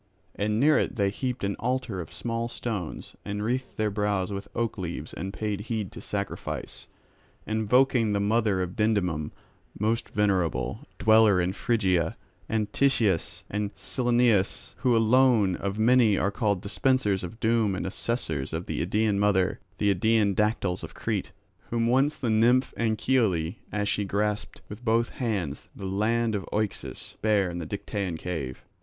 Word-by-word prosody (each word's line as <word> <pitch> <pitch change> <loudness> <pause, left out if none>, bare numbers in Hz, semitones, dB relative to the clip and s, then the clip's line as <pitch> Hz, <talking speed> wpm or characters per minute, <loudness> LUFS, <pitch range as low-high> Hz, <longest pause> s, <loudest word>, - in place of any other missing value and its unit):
And 105 +1 0
near 150 +3 +5
it - - -1
they 100 -2 +1
heaped 125 +2 -3
an 100 0 0
altar 125 -6 -1
of 80 - -9
small 115 0 -3
stones, 110 -8 -5
and 105 0 -3
wreathed 125 +4 -2
their 110 -1 +1
brows 100 -2 0
with 100 0 -5
oak 115 -3 -1
leaves 85 -3 -5
and 95 +3 -4
paid 105 -1 -3
heed 110 -5 -2
to - - -9
sacrifice, 100 -1 -5 0.6
invoking 115 +1 +3
the 100 - +1
mother 105 -2 +2
of 90 0 -6
Dindymum, 90 -8 +1 0.5
most 110 +3 0
venerable, 95 -6 0 0.2
dweller 110 -3 +5
in 90 +1 0
Phrygia, 95 -8 +1 0.3
and 110 -2 -1
Titias 115 -11 +1
and 105 0 -3
Cyllenus, 120 -5 +1
who 125 -3 +2
alone 115 -4 +4
of 100 +2 -3
many 115 -2 +4
are 100 - +1
called 100 -3 0
dispensers 105 -2 +1
of 100 +6 -7
doom 110 -3 +2
and - - -3
assessors 95 - -2
of 80 +2 -3
the - - -3
Idaean 105 +3 +1
mother,—the 100 0 +1
Idaean 105 +1 +2
Dactyls 100 -3 0
of - - -8
Crete, - - -2 0.4
whom 115 0 +1
once 135 +5 +3
the 120 -5 -1
nymph 120 +4 +3
Anchiale, 110 -7 +1
as 105 -1 -1
she 105 - +1
grasped 105 +1 -2
with 105 +4 -9
both 115 0 +2
hands 100 - -3
the 95 - -7
land 110 +4 +1
of 100 -2 -1
Oaxus, 105 -2 -3
bare 105 -4 +2
in 85 - -5
the 80 - -5
Dictaean 100 -2 -3
cave. 80 -7 -5
105 Hz, 155 wpm, -27 LUFS, 95-115 Hz, 0.6 s, near